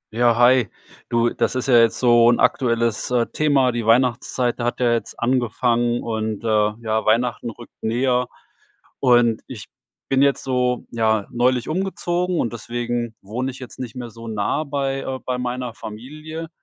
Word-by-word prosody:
Ja, 120 -1 +3
hi. 120 -3 +5 0.4
Du, 120 -1 +2
das - - -1
ist 130 - -2
ja 125 -3 +6
jetzt 115 -1 +3
so 120 -1 +5
'n 120 - +3
aktuelles, 115 -3 +1
äh, 120 -2 +2
Thema. 140 -4 +3
Die 120 -1 -3
Weihnachtszeit 120 +1 +1
hat 120 0 -2
ja 120 -2 +3
jetzt 115 - -4
angefangen 120 0 +1
und, 110 -1 -3
äh, 105 -2 +2
ja, 110 -1 -1
Weihnachten 120 +2 +1
rückt 115 +1 -12
näher. 125 +2 +1 0.7
Und 120 -3 +3
ich 115 -5 -9 0.4
bin 135 0 +2
jetzt 140 -1 +2
so, 125 -1 0
ja, 110 -3 +1
neulich 125 0 +1
umgezogen 180 0 -1
und 120 - -1
deswegen 120 0 -3
wohne 120 +7 -3
ich 130 - -12
jetzt 125 -2 -10
nicht 120 -4 -6
mehr 120 -2 -7
so 115 +1 -11
nah 110 +7 -1
bei, 135 -1 -2
äh 130 -1 -4
bei 125 -1 -2
meiner 125 -1 -3
Familie. 150 +10 -8
120 Hz, 165 wpm, -21 LUFS, 115-130 Hz, 0.7 s, ja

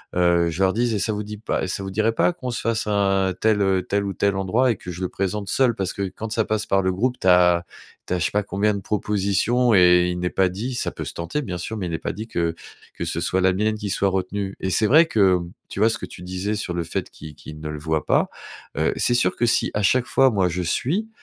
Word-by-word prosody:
heu, 85 -1 +3
je 85 +4 -1
leur 95 - +4
dise: 120 +3 0
«Et 105 - 0
ça 110 - 0
vous 105 0 -3
dit 105 +1 -7
pas 105 -2 -2
ça 95 +1 -3
vous 95 - -5
dirait 110 +3 +1
pas 115 - +2
qu'on 130 -7 -6
se 120 - -3
fasse 115 -1 -1
un 95 -2 +1
tel, 110 -1 +3
heu, 95 -1 +2
tel 100 0 -1
ou 100 - -3
tel 100 -1 0
endroit?» 110 +7 +2
Et 110 - -3
que 90 - -8
je 90 +1 -8
le 90 - -1
présente 100 +1 -3
seul. 125 -4 +2
Parce 95 -2 -2
que 100 - -4
quand 110 - -5
ça 110 -1 +1
passe 110 0 -1
par 95 0 +2
le 95 0 0
groupe, 125 +7 -1
tu - - -2
as 90 -1 +5 0.4
tu - - -2
as 90 - 0
je 85 - 0
sais - - -1
pas 105 - +1
combien 100 +2 0
de 100 - -3
propositions 105 +4 +1
et 90 -1 +6
il 90 0 -3
n'est 90 0 -1
pas 95 - +2
dit 110 +8 -4
ça 120 - -1
peut - - -6
se - - -5
tenter 85 - -3
bien 90 -7 -4
sûr, 110 +6 -5
mais 95 - -3
il - - -4
n'est 80 - -3
pas - - -3
dit 110 +2 -7
que 85 -6 -1 0.4
que - - -4
ce - - -2
soit 95 - 0
la 95 0 +4
mienne 105 +3 0
qui 105 -1 -5
soit 100 0 +1
retenue. 95 +1 -3
Et 95 - -1
c'est 110 - +3
vrai 155 +8 +6
que, 100 - +3
mmh, 85 0 -8 0.2
tu - - -7
vois, 110 - +5
ce 115 - -1
que - - -5
tu - - -12
disais 95 +4 -3
sur 100 -4 -4
le 85 -1 -2
fait 80 - -4
qu'ils 75 -2 -11
qu'ils 75 +1 -11
ne 75 - -6
le 75 - -5
voient 80 +1 -2
pas, - - +2 0.5
heu, - - +2
c'est - - +2
sûr 125 - +2
que 120 - +1
si 115 - +2
à 105 - 0
chaque 125 +6 +3
fois 135 +2 +4
moi 95 -4 +2
je 90 +2 -2
suis, 160 - -1
100 Hz, 290 wpm, -22 LUFS, 90-110 Hz, 0.5 s, et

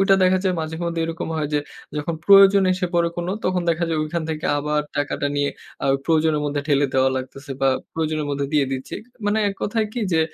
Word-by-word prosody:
ঐটা 195 0 +5
দেখা 185 0 +4
যায় 185 -1 +2
মাঝে 160 0 -4
মধ্যে 170 -1 -2
এরকম 165 0 -4
হয় 150 -2 -1
যে, - - +4 0.4
যখন 155 +3 -2
প্রয়োজন 195 0 +7
এসে 180 0 -1
পড়ে 170 -1 +3
কোন 175 0 -3 0.2
তখন 185 -1 +1
দেখা 170 +1 0
যায় 160 -2 0
ঐখান 165 +2 -3
থেকে 155 -1 -3
আবার 150 +1 0 0.2
টাকাটা 145 0 -1
নিয়ে 145 0 +1 0.3
আ - - +1 0.2
প্রয়োজনের 160 -2 +2
মধ্যে 145 0 -1
ঠেলে 145 -1 +3
দেওয়া 130 0 +4
লাগতেছে 135 +2 -7
বা 135 - +4 0.2
প্রয়োজনের 155 -2 -1
মধ্যে 140 0 -1
দিয়ে 145 -2 +3
দিচ্ছি। 130 0 -5 0.3
মানে 210 +1 +2
এক 200 - -4
কথায় 215 +1 0
কি 245 - -3
যে, 160 - +4
160 Hz, 215 wpm, -22 LUFS, 145-180 Hz, 0.4 s, প্রয়োজন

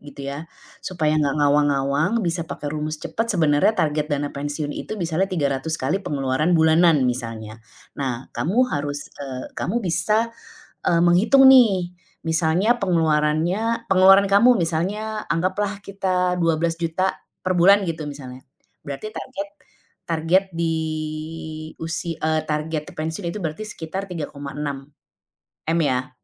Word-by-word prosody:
gitu 145 -1 -12
ya, 145 +3 -6 0.4
supaya 160 -4 -1
nggak 140 -1 +1
ngawang-ngawang 145 +4 +2
bisa 170 -1 -2
pakai 145 - -5
rumus 155 0 -3
cepat 225 +1 -3
sebenarnya 155 +1 +3
target 150 -2 0
dana 145 -1 -2
pensiun 145 +1 -4
itu 215 - -6
misalnya 170 +3 0
300 150 -3 -1
kali 150 +9 0
pengeluaran 145 0 0
bulanan 160 -3 +4
misalnya, 115 -3 -5 0.4
nah 130 -2 -3
kamu 190 +8 -2 0.2
harus, 145 0 -3
eee, 130 -2 -6
kamu 235 +6 -1
bisa, 210 +7 +1 0.6
eee, 170 - +3
menghitung 225 +10 +6
nih, 200 -9 +5 0.3
misalnya 165 +8 +2
pengeluarannya 170 +6 +1
pengeluaran 195 +1 +7
kamu 230 +5 +5
misalnya 205 +7 -2
anggaplah 190 +4 -1
kita 180 -2 0
Rp12.000.000 165 +2 0 0.3
per 185 - +1
bulan 195 +4 +6
gitu 160 -2 -3
misalnya, 130 -3 -9 0.4
berarti 140 +9 -5
target, 200 -6 -6 0.6
target 165 +4 +2
di 165 -1 0 1.1
usi 165 +1 -3
eee, 155 -1 0
target 150 0 -2
pensiun 160 +3 -3
itu 210 - -5
berarti 165 +5 -4
sekitar 190 +1 -5
Rp3.600.000.000 145 +1 -6
ya 130 -2 0
160 Hz, 125 wpm, -22 LUFS, 145-185 Hz, 1.1 s, pengeluaran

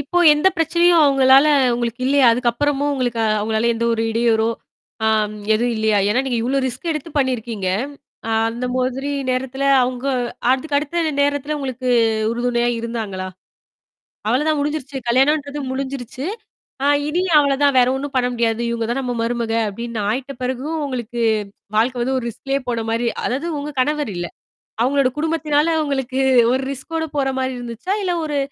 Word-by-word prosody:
இப்போ 290 +5 -1
எந்தப் 335 +6 +2
பிரச்சனையும் 340 +1 +4
அவங்களால 270 0 +6 0.3
உங்களுக்கு 235 0 -3
இல்லையா? 275 -1 +4
அதுக்கப்புறமும் 275 +4 0
உங்களுக்கு 245 -4 -1 0.2
அவங்களால 220 +2 0
எந்த 230 +1 -2
ஒரு 225 0 0
இடையூறோ 225 -1 +2 0.6
ஆம் 215 -1 +1 0.2
எதுவும் 240 +2 +1
இல்லையா? 220 -1 +2
ஏன்னா 235 +5 +2
நீங்க 245 -3 0
இவ்வளவு 265 +2 0
ரிஸ்க் 260 +7 -4
எடுத்துப் 305 0 -6
பண்ணி 260 -2 +2
இருக்கீங்க. 220 -4 -4 0.8
அந்த 235 +2 -4
மொதறி 260 +2 -1 0.2
நேரத்துல 265 +2 -2 0.2
அவங்க 250 +1 -3 0.5
அடுத்த 275 +3 0
அடுத்த 315 +2 -1
நேரத்துல 285 +1 0
உங்களுக்கு 255 -2 -4 0.4
உறுதுணையா 240 0 0
இருந்தாங்களா? 220 -5 -4 1.0
அவ்வளவுதான். 295 +7 +1
முடிஞ்சிருச்சு. 285 -2 -3
கல்யாணம்ன்றது 285 +3 +2
முடிஞ்சுருச்சு. 265 -1 -5 0.6
ஆ - - +4 0.2
இனி 335 +4 0 0.2
அவ்வளவுதான். 280 -1 +2
வேற 245 - +5
ஒண்ணும் 275 0 -5
பண்ண 250 -1 +2
முடியாது. 230 -1 0
இவங்க 230 -1 -2
தான் 270 - -1
நம்ம 250 -2 -3
மருமக 230 -1 -1 0.2
அப்படின்னு 235 +2 -5
ஆயிட்ட 260 +5 -2
பிறகும், 260 +6 -2
உங்களுக்கு 240 -3 -5 0.6
வாழ்க்கை 245 +3 +2
வந்து 260 +2 0
ஒரு 235 - -6
ரிஸ்க்லேயே 270 +4 -3
போன 235 - -1
மாரி 230 +1 0 0.2
அதாவது 275 +7 -2
உங்க 290 +1 -5
கணவர் 295 -4 -1
இல்ல 175 0 -3 0.5
அவங்களோட 270 +1 +3
குடும்பத்துனால 315 0 +1
உங்களுக்கு 265 -2 -2 0.3
ஒரு 260 +1 +1
ரிஸ்க்கோட 320 +4 -4
போற 270 -1 +1
மாரி 260 0 -1
இருந்துச்சா? 245 - -4
இல்ல 365 - 0
ஒரு 295 -1 -2
260 Hz, 150 wpm, -20 LUFS, 235-285 Hz, 1.0 s, அவங்களால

